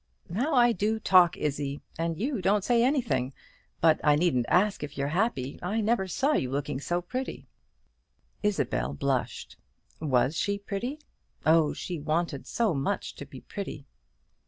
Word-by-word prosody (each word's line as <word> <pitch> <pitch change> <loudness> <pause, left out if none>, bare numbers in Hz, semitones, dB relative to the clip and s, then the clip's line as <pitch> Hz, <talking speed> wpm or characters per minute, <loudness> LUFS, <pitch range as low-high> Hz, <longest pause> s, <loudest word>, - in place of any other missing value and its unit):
How 270 - 0
I 240 -1 +6
do 220 +2 0
talk, 180 -5 +5
Izzie, 145 -1 -2 0.2
and 165 0 -2
you 250 -1 -1
don't 195 +2 +2
say 235 +1 +3
anything! 150 - +1 0.5
But 160 -1 +4
I 150 -1 +5
needn't 145 -7 +2
ask 200 +3 +3
if 150 -1 -6
you're 140 0 -1
happy. 155 - -1
I 200 +6 -1
never 220 -2 +1
saw 270 - +1
you 130 - 0
looking 140 0 -2
so 175 +3 -1
pretty." 255 +9 -5 1.0
Isabel 70 - 0
blushed. 135 - -2 0.4
Was 135 -1 +2
she 200 +4 0
pretty? 220 +9 -4 0.4
Oh, 160 -1 +4
she 175 -3 -5
wanted 155 -1 -1
so 225 -6 +1
much 135 -1 -2
to 145 - -8
be 135 -2 -11
pretty! 185 -8 -7
175 Hz, 155 wpm, -28 LUFS, 145-210 Hz, 1.0 s, I